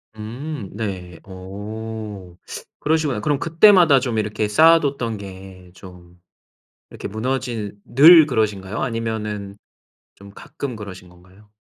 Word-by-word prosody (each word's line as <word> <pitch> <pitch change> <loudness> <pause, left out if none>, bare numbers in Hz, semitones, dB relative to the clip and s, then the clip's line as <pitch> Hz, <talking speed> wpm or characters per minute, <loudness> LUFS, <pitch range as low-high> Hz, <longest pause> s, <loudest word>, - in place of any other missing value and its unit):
음 115 +2 -7
네. 95 -5 -6
어. 100 0 -8 0.4
그러시구나. 150 -6 0
그럼 145 +4 -1
그때마다 170 -3 +5
좀 120 -5 -3
이렇게 105 0 -1
쌓아 165 +9 +6
뒀던 125 -7 -3
게 95 -2 -12
좀 90 -2 -15 0.7
이렇게 - - -7
무너진 115 -2 -4
늘 155 +4 +7
그러신가요? 105 -5 -2
아니면은 105 -5 -4 0.6
좀 100 0 -14
가끔 125 +4 -7
그러신 95 -4 -10
건가요? 95 +4 -21
110 Hz, 255 characters per minute, -21 LUFS, 95-130 Hz, 0.7 s, 늘